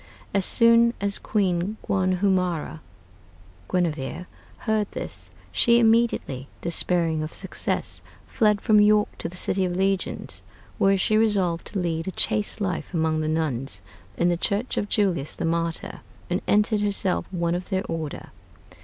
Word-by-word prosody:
As 195 -2 +2
soon 230 0 +5
as 200 0 -2
Queen 195 0 0
Guanhumara 185 - 0 0.9
[Guinevere] 170 -2 -2 0.4
heard 215 -2 0
this, 90 -2 -4 0.2
she 235 - +4
immediately, 225 - +2
despairing 170 -1 +1
of 155 +1 -5
success, - - -1 0.2
fled 210 -3 +2
from 215 -3 +5
York 210 0 +3
to 170 - -1
the 180 - -12
City 190 +1 0
of 180 -1 -1
Legions, 190 0 -1 0.4
where 195 0 +4
she 215 +3 +2
resolved 195 -6 +1
to 200 - -2
lead 165 -1 -2
a - - -1
chaste 210 +4 0
life 185 -2 -3
among 160 -1 +1
the 155 - -1
nuns 135 -9 -1 0.4
in 175 - +2
the 175 -1 +2
church 205 +7 -1
of 205 - -2
Julius 180 -9 0
the - - -3
Martyr, 165 0 -1 0.3
and - - 0
entered 210 0 +3
herself 200 -2 0
one 170 -2 0
of 180 +1 -4
their 190 -1 0
order.... 160 -3 -5
185 Hz, 145 wpm, -25 LUFS, 165-210 Hz, 0.9 s, soon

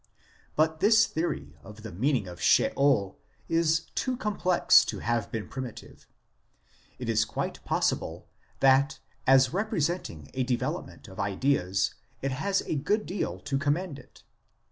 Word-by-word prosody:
But 160 +1 +2
this 220 +4 +5
theory 165 +2 -3
of 105 +2 -13
the 110 - -7
meaning 115 - 0
of 90 -1 -9
Sheol 135 -9 +3 0.3
is 165 -1 +2
too 255 -1 -1
complex 190 -6 +4
to - - -4
have 120 -1 -1
been 110 -2 -4
primitive; 130 -4 -8 0.9
it - - -6
is - - +3
quite - - -4
possible - - -1 0.3
that 135 +2 +4 0.3
as 135 0 +5
representing 170 - -2
a 130 - -1
development 125 -1 -3
of 95 - -12
ideas 100 -1 0 0.3
it 135 - 0
has 190 +9 0
a - - -2
good 205 +9 0
deal 165 - -3
to 135 +7 -2
commend 150 +1 -1
it. - - -18
140 Hz, 140 wpm, -28 LUFS, 110-170 Hz, 0.9 s, this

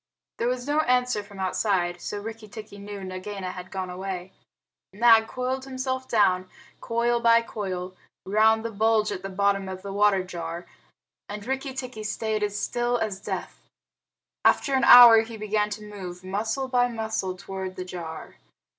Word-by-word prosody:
There 235 - +1
was 250 0 -2
no 295 +2 +1
answer 250 -6 +2
from 200 -1 -13
outside, 185 -2 0
so 205 - -4
Rikki 220 +1 -8
tikki 210 -1 -10
knew 200 -1 -8
Nagaina 185 0 -5
had 180 0 -9
gone 185 -1 -4
away. 185 0 -6 0.6
Nag 225 +1 +5
coiled 260 +2 -3
himself 260 0 -3
down, 185 -4 +2 0.3
coil 235 +1 0
by 230 0 +5
coil, 185 -4 -5 0.3
round 220 +3 +3
the 230 - -2
bulge 220 0 +2
at 185 - -4
the 195 - -5
bottom 195 0 0
of 185 0 -7
the 200 -1 -6
water 200 -2 +3
jar, 170 -1 -6 0.6
and 205 0 -6
Rikki 265 0 -3
tikki 255 -4 -6
stayed 215 0 -2
still 240 +4 -1
as 215 -4 -3
death. - - -6 0.8
After 275 - +3
an 260 -2 +3
hour 235 -2 +10
he 225 0 -8
began 210 0 0
to 210 0 -7
move, 185 -3 -8
muscle 220 +8 -2
by 245 -1 +2
muscle, 220 -5 -3
toward 190 0 -6
the 185 - -5
jar. 165 -3 -8
210 Hz, 165 wpm, -26 LUFS, 190-235 Hz, 0.8 s, hour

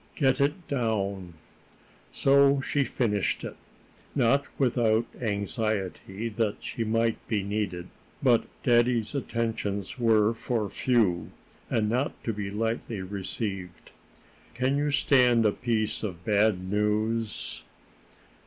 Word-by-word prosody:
"Get 135 -2 +2
it 150 +5 0
down." 100 - -2 0.8
So 140 0 +4
she 140 +1 0
finished 105 -7 0
it, - - -6 0.6
not 140 +2 +3
without 120 -3 +2 0.2
anxiety 100 0 -2
that 110 -1 -2
she 115 - -3
might 115 +1 +1
be 105 -3 0
needed. 100 -3 -3 0.4
But 120 -4 +4 0.2
daddy's 120 -2 +3
attentions 115 -5 -2
were 110 -2 +4
for 115 -2 -2
few, 110 -9 +1 0.4
and 110 -2 +1
not 125 +6 0
to 115 - -1
be 100 -1 -4
lightly 110 -1 -2
received. 95 -2 -5 0.6
"Can 130 +3 +1
you 145 +1 +1
stand 125 -5 +4
a 105 - +5
piece 110 -1 -1
of 90 -5 -5
bad 105 -3 +2
news?" 105 - -1
110 Hz, 115 wpm, -27 LUFS, 100-120 Hz, 0.8 s, a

